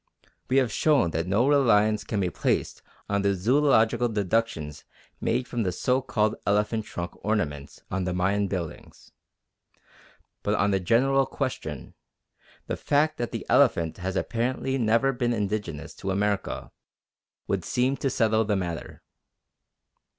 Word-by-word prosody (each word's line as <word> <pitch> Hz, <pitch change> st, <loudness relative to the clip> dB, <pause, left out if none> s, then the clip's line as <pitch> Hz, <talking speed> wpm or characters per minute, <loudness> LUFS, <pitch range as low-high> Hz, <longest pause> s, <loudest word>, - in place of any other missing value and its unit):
We 130 Hz, -, +3 dB
have 130 Hz, -5 st, +3 dB
shown 145 Hz, -, +3 dB
that 80 Hz, +2 st, -2 dB
no 105 Hz, +7 st, +2 dB
reliance 110 Hz, -7 st, +3 dB
can 105 Hz, -, -2 dB
be 90 Hz, -2 st, 0 dB
placed -, -, -1 dB, 0.3 s
on 100 Hz, 0 st, 0 dB
the 100 Hz, 0 st, +2 dB
zoological 120 Hz, +1 st, +3 dB
deductions 100 Hz, -7 st, -1 dB, 0.4 s
made 125 Hz, -1 st, 0 dB
from 120 Hz, 0 st, -2 dB
the 95 Hz, -4 st, 0 dB
so 125 Hz, +8 st, +1 dB
called 110 Hz, -4 st, 0 dB
elephant 105 Hz, +2 st, +1 dB
trunk 85 Hz, -1 st, -5 dB
ornaments 75 Hz, -10 st, -2 dB
on 95 Hz, -1 st, -1 dB
the 90 Hz, -, -1 dB
Mayan 100 Hz, +3 st, +1 dB
buildings. 90 Hz, -5 st, -6 dB, 1.3 s
But -, -, 0 dB
on 100 Hz, +1 st, +2 dB
the 95 Hz, -, +2 dB
general 135 Hz, +8 st, +3 dB
question, 100 Hz, -, -4 dB, 0.7 s
the -, -, -3 dB
fact 150 Hz, +2 st, +1 dB
that 120 Hz, -, -3 dB
the -, -, -5 dB
elephant 80 Hz, -2 st, +3 dB
has 95 Hz, 0 st, -4 dB
apparently 130 Hz, +5 st, -1 dB
never 115 Hz, +4 st, +2 dB
been 120 Hz, -1 st, 0 dB
indigenous 100 Hz, -8 st, -3 dB
to 95 Hz, -, -5 dB
America 100 Hz, +1 st, -1 dB, 0.7 s
would -, -, -1 dB
seem 130 Hz, +2 st, +1 dB
to 135 Hz, -, -1 dB
settle 110 Hz, -2 st, +2 dB
the 105 Hz, -1 st, 0 dB
matter. 85 Hz, -3 st, -5 dB
105 Hz, 145 wpm, -26 LUFS, 95-125 Hz, 1.3 s, We